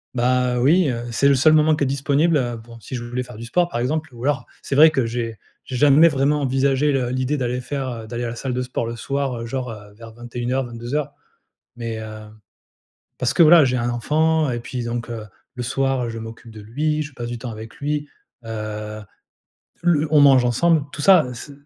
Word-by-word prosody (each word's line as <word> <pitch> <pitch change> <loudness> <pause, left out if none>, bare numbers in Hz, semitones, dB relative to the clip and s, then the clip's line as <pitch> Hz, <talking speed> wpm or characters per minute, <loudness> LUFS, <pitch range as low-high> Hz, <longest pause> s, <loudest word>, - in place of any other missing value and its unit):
Bah, 125 0 +1
heu, 120 - 0
oui, 160 +3 +4
heu, 120 -1 -3
c'est 140 +4 +2
le 140 - +5
seul 155 +4 +5
moment 155 0 +4
qui 150 - -1
est - - +1
disponible, 145 +4 +2
heu. 120 -3 -2
Bon, 115 +1 -13
si 130 - -8
je 120 - -5
voulais 125 +1 -3
faire 125 - -9
du 115 - -7
sport, 175 +8 +1
par 120 - -3
exemple, 155 +5 -1
ou, 120 - -9
alors, 140 -3 -1 0.2
c'est 140 - -3
vrai 155 +3 +8
que, 135 -6 0
j'ai 115 -1 -4 0.3
j'ai 130 - -6
jamais 145 +5 +6
vraiment 145 0 +1
envisagé 135 +2 +1
le 130 -3 0
l'idée 130 +3 -1
d'aller 125 0 -2
faire, 135 0 -4
heu, 115 -2 -7
d'aller 120 +1 -4
à 120 - -2
la 120 - -6
salle 130 +1 -4
de 125 - -1
sport 125 -2 -3
le 115 - -5
soir, 135 0 -2
heu, 115 - -5
genre, 125 0 -4
heu, 105 -1 -11
vers 115 +1 -12
21:00, 120 +2 -3
22:00, 120 +5 -4 0.6
mais, 115 -2 -5
heu. 110 -1 -9 0.9
Parce 125 0 0
que, 170 - +5
voilà, 160 -1 +8
j'ai 125 -1 +1
un 120 0 -1
enfant 155 +5 +1
et 120 - -3
puis, 120 0 -5
donc, 120 0 -4
heu, 110 -2 -5 0.3
le 125 - -3
soir, 135 +1 0
heu, 115 - -3
je 115 - -6
m'occupe 115 0 -10
de 110 - -10
lui. 150 +8 -1
Je 150 -1 -9
passe 120 -2 -6
du 120 0 -5
temps 120 +1 -6
avec 110 -1 -9
lui, 145 0 -3 0.4
heu, 110 -1 -5 0.8
le 160 -3 +2
on 150 -2 +6
mange 135 -3 +6
ensemble, 160 +5 +2
tout 145 - -6
ça 185 -5 +6
heu, 125 - -6
ce 140 +4 -9
125 Hz, 235 wpm, -21 LUFS, 115-145 Hz, 0.9 s, vrai